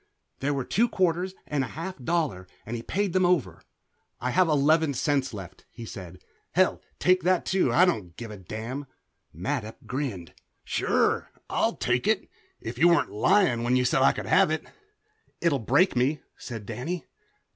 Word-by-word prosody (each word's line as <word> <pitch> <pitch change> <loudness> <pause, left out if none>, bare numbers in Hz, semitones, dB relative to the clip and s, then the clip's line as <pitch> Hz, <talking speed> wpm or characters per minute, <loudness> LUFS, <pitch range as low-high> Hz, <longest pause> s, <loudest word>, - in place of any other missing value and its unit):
There 145 +1 0
were 135 -2 -2
two 235 +3 +2
quarters 185 +1 0
and 145 -2 -1
a - - -3
half 185 +3 -4
dollar, 145 - -1 0.2
and 115 - -4
he 115 - -4
paid 195 - -1
them 185 - +3
over. 170 - +1 0.6
"I 125 - -1
have 185 +3 +4
eleven 155 0 +3
cents 140 0 +1
left," 95 -5 -10
he 115 - -9
said. 90 -4 -9 0.4
"Hell, - - +3 0.2
take 185 0 +3
that 180 +1 +2
too. 190 0 +2
I 180 - +6
don't 95 - -2
give 115 -2 -7
a 105 - -8
damn." 115 +9 -6 0.4
Mattup 110 - -4
grinned. 115 - -4 0.3
"Sure - - +1 0.2
I'll - - +1
take - - 0
it - - +1 0.3
if 115 - -6
you 170 - +6
weren't 170 0 +3
lying 150 - +3
when 120 +1 +2
you 125 0 +2
said 130 - +2
I 135 - +6
could - - -5
have 190 -2 +4
it." 155 0 -2 0.7
"It'll 165 -5 +2
break 145 - +3
me," 135 +5 +1
said 115 -4 -7
Danny. 165 - -4
140 Hz, 175 wpm, -27 LUFS, 115-175 Hz, 0.7 s, I